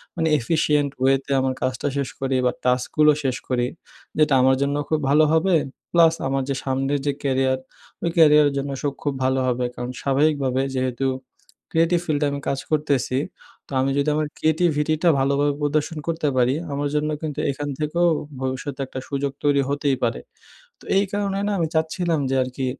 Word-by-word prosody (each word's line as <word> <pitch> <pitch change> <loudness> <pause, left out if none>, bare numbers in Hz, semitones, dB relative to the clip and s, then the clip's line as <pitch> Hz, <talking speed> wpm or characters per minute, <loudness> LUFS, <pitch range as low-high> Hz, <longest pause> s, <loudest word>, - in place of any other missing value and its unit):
মানে 165 -1 0
efficient 150 +1 +1
way 135 +1 +5
তে 140 - -7
আমার 130 0 0
কাজটা 130 +2 -1
শেষ 140 -2 -1
করি 135 -1 0
বা, 125 - +3
task 125 0 +2
গুলো 150 0 +7
শেষ 130 -2 0
করি। 125 -1 +1 0.5
যেটা 155 -2 +3
আমার 130 +1 +4
জন্য 140 +1 +1
খুব 155 - +1
ভালো 150 +2 +5
হবে। 170 +3 +3 0.4
Plus 165 -1 +5
আমার 135 0 0
যে 140 - 0
সামনের 135 +2 0
যে 145 - +2
career, 130 -1 +1 0.5
ওই 170 - +1
career, 150 -2 +7
এর - - -7
জন্য 140 0 -2
সব 145 -2 0
খুব 145 - 0
ভালো 130 +1 +2
হবে। 125 0 0
কারণ, 125 0 -5
স্বাভাবিকভাবে 140 -2 +1
যেহেতু 130 0 -1 0.7
creative 165 +1 +2
field 155 -3 -1
এ - - +3
আমি 140 - -3
কাজ 140 - 0
করতেছি। 145 -4 +1 0.5
তো - - -19
আমি 135 +1 +1
যদি 145 +2 +2
আমার 155 0 0
creativity 155 -1 +1
টা 175 - +6
ভালোভাবে 140 +2 +2
প্রদর্শন 150 +2 0
করতে 165 -2 -1
পারি, 125 +1 +3 0.2
আমার 145 +1 -1
জন্য 150 +1 0
কিন্তু 155 -3 -4
এখান 145 +1 -5
থেকেও 170 +3 +1 0.3
ভবিষ্যতে 130 +1 -4
একটা 130 - -6
সুযোগ 140 -1 -1
তৈরি 145 -1 +3
হতেই 140 -1 +1
পারে। 115 -1 0 0.6
তো - - -16
এই 195 - +4
কারণে 200 -1 -1
না - - 0
আমি 165 - +1
চাচ্ছিলাম 160 0 0
যে - - +2
আরকি 130 +1 -4
145 Hz, 185 wpm, -23 LUFS, 130-155 Hz, 0.7 s, গুলো